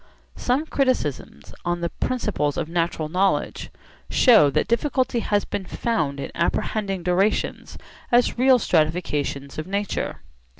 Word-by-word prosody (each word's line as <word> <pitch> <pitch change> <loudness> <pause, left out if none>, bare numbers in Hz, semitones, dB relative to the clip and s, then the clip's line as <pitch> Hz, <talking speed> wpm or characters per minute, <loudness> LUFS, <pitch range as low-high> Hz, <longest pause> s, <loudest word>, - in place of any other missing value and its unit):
Some 260 +5 0
criticisms 255 - -2
on 175 0 -1
'The 170 - -2
Principles 210 - -1
of - - -2
Natural 165 -2 -1
Knowledge' 185 +5 0 0.4
show 220 - +6
that 140 - 0
difficulty 255 0 +1
has 205 -2 0
been 200 - -4
found 155 -12 -1
in - - -5
apprehending 195 +2 -1
durations 185 +4 0 0.3
as 240 0 +3
real 255 +1 +5
stratifications 155 - -1
of 155 - -5
nature. 200 +1 -3
190 Hz, 125 wpm, -23 LUFS, 155-235 Hz, 0.4 s, show